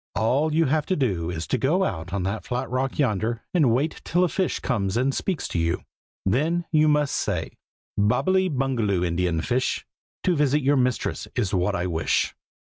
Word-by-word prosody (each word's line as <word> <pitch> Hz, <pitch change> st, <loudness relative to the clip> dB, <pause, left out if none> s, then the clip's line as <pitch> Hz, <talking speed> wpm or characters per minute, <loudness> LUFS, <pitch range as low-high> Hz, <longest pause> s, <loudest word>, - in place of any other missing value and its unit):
All 130 Hz, -, +2 dB
you 160 Hz, +2 st, +3 dB
have 150 Hz, +2 st, +1 dB
to 185 Hz, -, +1 dB
do 95 Hz, -, 0 dB
is 85 Hz, -2 st, -3 dB
to 130 Hz, -, -1 dB
go 165 Hz, -, +2 dB
out 90 Hz, -, -3 dB
on 100 Hz, -1 st, -1 dB
that 100 Hz, +4 st, -2 dB
flat 125 Hz, +1 st, -3 dB
rock 130 Hz, +1 st, -1 dB
yonder, 115 Hz, -3 st, 0 dB
and 155 Hz, -8 st, +4 dB
wait 140 Hz, +7 st, 0 dB
till 175 Hz, +2 st, +2 dB
a 180 Hz, -, +2 dB
fish 190 Hz, +1 st, -1 dB
comes 100 Hz, -5 st, -1 dB
and 130 Hz, +3 st, +1 dB
speaks 185 Hz, +2 st, -2 dB
to 85 Hz, -, -1 dB
you. 85 Hz, +2 st, 0 dB, 0.4 s
Then 160 Hz, -, +1 dB
you 155 Hz, -1 st, +4 dB
must 150 Hz, -1 st, +2 dB
say 90 Hz, -6 st, -1 dB, 0.5 s
"'Bobbily 185 Hz, -, +2 dB
Bungaloo, 120 Hz, -, 0 dB
Indian 85 Hz, -1 st, 0 dB
fish. 125 Hz, +7 st, -1 dB, 0.4 s
To 180 Hz, -, +2 dB
visit 145 Hz, -1 st, +2 dB
your 140 Hz, +2 st, +4 dB
mistress 125 Hz, -1 st, 0 dB
is 105 Hz, -7 st, 0 dB
what 95 Hz, +2 st, +1 dB
I 90 Hz, -1 st, -1 dB
wish.' 85 Hz, -3 st, 0 dB
125 Hz, 190 wpm, -25 LUFS, 95-150 Hz, 0.5 s, and